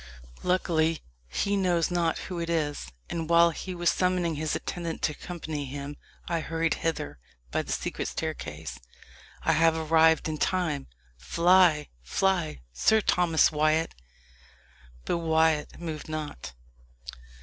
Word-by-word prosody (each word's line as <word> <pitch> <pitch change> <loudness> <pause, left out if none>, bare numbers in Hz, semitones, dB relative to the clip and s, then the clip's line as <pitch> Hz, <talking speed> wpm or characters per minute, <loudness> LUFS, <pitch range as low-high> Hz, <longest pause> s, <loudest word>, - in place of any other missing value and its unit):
Luckily, 165 -3 +1 0.2
he 200 - 0
knows 180 -3 +1
not 170 -2 +1
who 180 -2 -5
it 170 0 -3
is, 145 - -1 0.2
and 165 -1 -4
while 170 0 +6
he 185 +2 -6
was 175 0 +2
summoning 180 -2 +1
his 155 0 -1
attendants 170 -2 -3
to - - +1
accompany 155 -2 -5
him, 140 +2 -6 0.3
I 170 -1 0
hurried 165 +1 0
hither 75 - -3 0.3
by - - +1
the - - -7
secret - - -2
staircase. 80 - -5 0.6
I - - +3
have 165 0 +4
arrived 160 0 +4
in 155 -1 -3
time. 170 -7 0 0.3
Fly 170 - +4
fly! 170 - 0
Sir 220 - +4
Thomas 175 -5 +3
Wyat!" 155 +1 +2 1.1
But - - 0
Wyat 160 -2 +1
moved 160 -3 -6
not. 155 - -5
160 Hz, 130 wpm, -28 LUFS, 155-175 Hz, 1.1 s, while